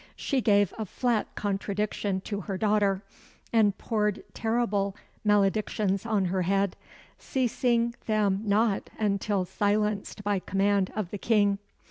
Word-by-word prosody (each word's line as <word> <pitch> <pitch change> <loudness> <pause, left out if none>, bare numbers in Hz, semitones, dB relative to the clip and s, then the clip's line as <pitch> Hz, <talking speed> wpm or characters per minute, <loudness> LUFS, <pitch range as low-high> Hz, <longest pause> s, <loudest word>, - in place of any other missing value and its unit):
She 270 -3 0
gave 205 -4 +3
a 220 - -1
flat 235 +1 0
contradiction 200 -1 -2
to 205 +1 -4
her 195 0 -4
daughter, 205 -1 +2 0.5
and 210 -4 +4
poured 210 -3 -1
terrible 210 -4 0 0.3
maledictions 205 0 +1
on 210 -4 +1
her 185 +1 0
head, 195 +1 +1 0.4
ceasing 235 -2 +1
them 205 -3 +2
not 210 0 +1
until 200 -2 0
silenced 205 +1 -1
by 205 -1 +1
command 195 +1 +1
of 210 -5 -3
the 205 - -5
King. 205 -3 +2
205 Hz, 125 wpm, -28 LUFS, 195-215 Hz, 0.5 s, and